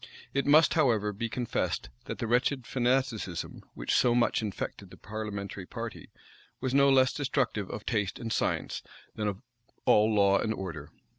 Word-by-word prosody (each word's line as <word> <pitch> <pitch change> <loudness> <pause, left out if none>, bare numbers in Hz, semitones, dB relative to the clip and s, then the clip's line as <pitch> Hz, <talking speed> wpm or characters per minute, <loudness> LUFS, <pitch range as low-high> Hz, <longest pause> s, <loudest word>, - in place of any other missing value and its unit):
It 140 0 0
must, 155 +2 +6
however, 105 -5 +2
be 115 +3 -3
confessed, 120 - -2 0.2
that - - -5
the - - -2
wretched 125 +2 +1
fanaticism, 125 -8 -1
which - - -2
so 120 -1 +4
much 120 -1 +2
infected 105 -3 -5
the - - -13
parliamentary 100 -3 -6
party, - - -7 0.5
was 130 0 -2
no 140 0 +6
less 130 -1 +5
destructive 130 -8 -1
of 105 - -6
taste 105 -4 -1
and 115 -2 -3
science, - - -1 0.3
than 105 - -2
of 100 +3 -4 0.4
all 105 +1 +5
law 100 -2 +4
and 110 - -1
order. 80 -6 -6
110 Hz, 160 wpm, -29 LUFS, 105-130 Hz, 0.5 s, must